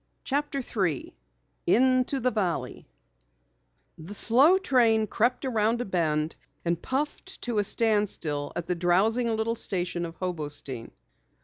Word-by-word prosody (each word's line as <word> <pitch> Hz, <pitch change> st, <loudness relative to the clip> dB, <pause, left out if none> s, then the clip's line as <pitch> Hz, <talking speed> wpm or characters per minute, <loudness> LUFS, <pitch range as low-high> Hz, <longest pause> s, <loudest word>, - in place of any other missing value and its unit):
CHAPTER 280 Hz, -1 st, -1 dB
3 185 Hz, -, -2 dB, 0.5 s
INTO 255 Hz, +2 st, +3 dB
THE 255 Hz, +1 st, +2 dB
VALLEY 190 Hz, -6 st, -2 dB, 1.1 s
The 175 Hz, +6 st, -7 dB
slow 270 Hz, -, +5 dB
train 235 Hz, -, +3 dB
crept 245 Hz, +5 st, 0 dB
around 230 Hz, -2 st, +1 dB
a 245 Hz, -, -2 dB
bend 160 Hz, -4 st, 0 dB, 0.3 s
and 170 Hz, 0 st, 0 dB
puffed 295 Hz, +8 st, -3 dB
to 235 Hz, -3 st, 0 dB
a -, -, +2 dB
standstill 200 Hz, -10 st, 0 dB
at 175 Hz, -, -3 dB
the 180 Hz, -, 0 dB
drowsing 190 Hz, +8 st, +2 dB
little 220 Hz, +1 st, 0 dB
station 180 Hz, -5 st, -2 dB
of 165 Hz, -, -11 dB
Hobostein. 145 Hz, -9 st, -4 dB
215 Hz, 125 wpm, -27 LUFS, 175-250 Hz, 1.1 s, slow